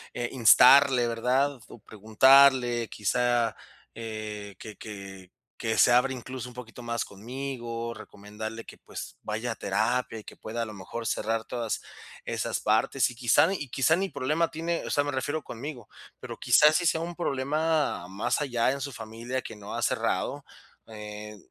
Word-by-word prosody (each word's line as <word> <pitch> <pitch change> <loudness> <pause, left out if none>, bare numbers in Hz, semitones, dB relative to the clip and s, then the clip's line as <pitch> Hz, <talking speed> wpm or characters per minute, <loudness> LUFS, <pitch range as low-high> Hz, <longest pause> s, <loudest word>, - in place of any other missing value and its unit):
eh, 120 0 -2
instarle, 125 +1 +7
¿verdad?, 125 +4 0
o - - -12
preguntarle, 120 +3 +4
quizá, 120 +2 +1 0.4
eh, 110 -3 -6
que 110 +1 -10
que 95 -3 -10 0.2
que 110 -1 -2
se - - +6
abra 125 +2 +4
incluso 125 0 -6
un 120 - -15
poquito 125 0 -10
más 120 -1 -2
conmigo, 115 +1 -5
recomendarle 110 +2 -8
que, - - -12
pues, - - -9
vaya 110 +3 -3
a - - -17
terapia 115 +4 -1
y 105 - -12
que - - -11
pueda, 115 +2 -4
a - - -3
lo 110 - -8
mejor, 110 +4 -6
cerrar 110 +2 -1
todas 115 -2 -3 0.5
esas - - -2
partes. 110 +5 +2
Y - - -12
quizá 125 +6 +4
ni 195 - -1
y 145 -7 -6
quizá 135 +6 +3
ni 190 +2 -1
problema 150 +4 0
tiene, 165 +1 -2
o - - -5
sea, 145 - +1
me 145 - -2
refiero 145 +4 -2
conmigo, 120 -1 -8 0.3
pero - - -8
quizás 150 +1 +5
sí 175 - +1
sea 160 - +2
un 170 +1 -5
problema 150 - 0
más 100 +8 -1
allá 125 -3 +1
en 140 - -4
su 140 +1 -4
familia 115 +2 -5
que - - -9
no 105 0 -9
ha - - -3
cerrado. - - -1 0.4
Eh, 105 -1 -8
120 Hz, 175 wpm, -27 LUFS, 110-135 Hz, 0.5 s, instarle